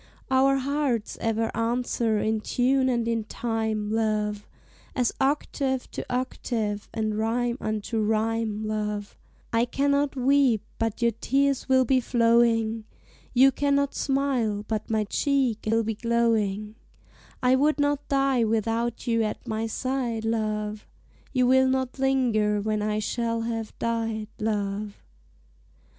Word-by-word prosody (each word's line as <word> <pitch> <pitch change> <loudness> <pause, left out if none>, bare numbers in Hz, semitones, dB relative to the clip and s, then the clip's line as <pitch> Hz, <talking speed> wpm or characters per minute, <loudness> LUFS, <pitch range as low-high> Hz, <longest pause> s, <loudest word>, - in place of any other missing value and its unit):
Our 270 +1 +4
hearts 270 -4 -1
ever 225 0 -1
answer 230 -1 0
in 220 +1 0
tune 260 +3 +2
and 235 -2 0
in 230 -1 0
time, 220 -2 -2
love, 215 -2 -1 0.5
As 250 -3 +1
octave 270 -1 0
to - - -4
octave, 230 -4 -2
and 215 -1 -2
rhyme 235 +2 0
unto 215 +1 -2
rhyme, 220 0 0
love: 210 -1 -3 0.4
I 230 +1 +3
cannot 280 +3 +1
weep 260 -4 +3 0.2
but 225 +1 -1
your 235 - +4
tears 270 +5 0
will 260 -1 +5
be 260 +2 +3
flowing, 230 -2 +2 0.5
You 265 +2 +7
cannot 280 0 +1
smile 255 -7 0
but 215 -1 -3
my 220 -1 +1
cheek 255 0 0
will 225 +1 +2
be 220 +1 -1
glowing; 215 -2 0 0.7
I 250 +1 +5
would 295 +3 +2
not 290 0 0
die 275 -3 +2
without 225 +1 -1
you 230 -1 +1
at 220 +3 -3
my 220 0 -2
side, 240 -2 -2
love, 215 -1 -2 0.4
You 255 -2 +2
will 260 +1 +5
not 260 0 -1
linger 235 -6 +2
when 215 +1 -1
I 210 0 0
shall 230 +1 -1
have 225 -1 -4
died, 225 -2 -2
love. 205 -1 -2
230 Hz, 130 wpm, -26 LUFS, 215-260 Hz, 0.7 s, You